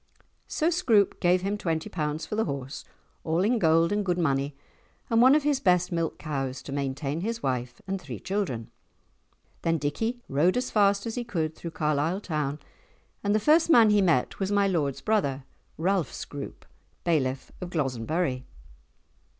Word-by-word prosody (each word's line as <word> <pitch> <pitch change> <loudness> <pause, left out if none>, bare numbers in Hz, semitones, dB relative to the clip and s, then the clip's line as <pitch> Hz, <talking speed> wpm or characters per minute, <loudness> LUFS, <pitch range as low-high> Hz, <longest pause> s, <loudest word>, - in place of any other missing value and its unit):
So 325 +2 +1
Scroope 230 - +3
gave 180 0 +3
him 205 +2 -1
twenty 160 -3 -1
pounds 150 -2 -3
for - - -7
the 220 - +1
horse, 140 -1 -5 0.4
all 165 +3 +1
in 235 +3 +2
gold 165 0 +4
and 205 0 +1
good 180 -2 0
money, 140 -4 0 0.6
and 230 0 +5
one 260 +3 +7
of 305 - +2
his 290 -2 +2
best 180 -4 +2
milk 165 -1 -1
cows 135 -4 -4
to - - -8
maintain 140 +2 -2
his 230 +4 -3
wife 125 -2 -3
and 195 0 -3
three - - -7
children. 185 - -3 0.9
Then 165 0 +1
Dickie 225 - -2
rode 160 - +2
as 250 - -2
fast 200 -1 +3
as 225 - -3
he 245 - -3
could 160 -9 -2
through 170 - -6
Carlisle 155 +5 0
town, 150 -6 -2 0.7
and 205 +1 +2
the - - +3
first 310 +8 +4
man 230 -9 +7
he 205 -1 +4
met 165 -9 +1
was 195 0 -1
my 200 -1 +3
lord's 150 -8 -1
brother, 145 -12 0 0.3
Ralph 180 -1 +1
Scroope, 140 -1 -7 0.4
Bailiff 135 -6 0
of 180 - -4
Glozenburrie. 135 -1 -1
170 Hz, 170 wpm, -27 LUFS, 145-205 Hz, 0.9 s, one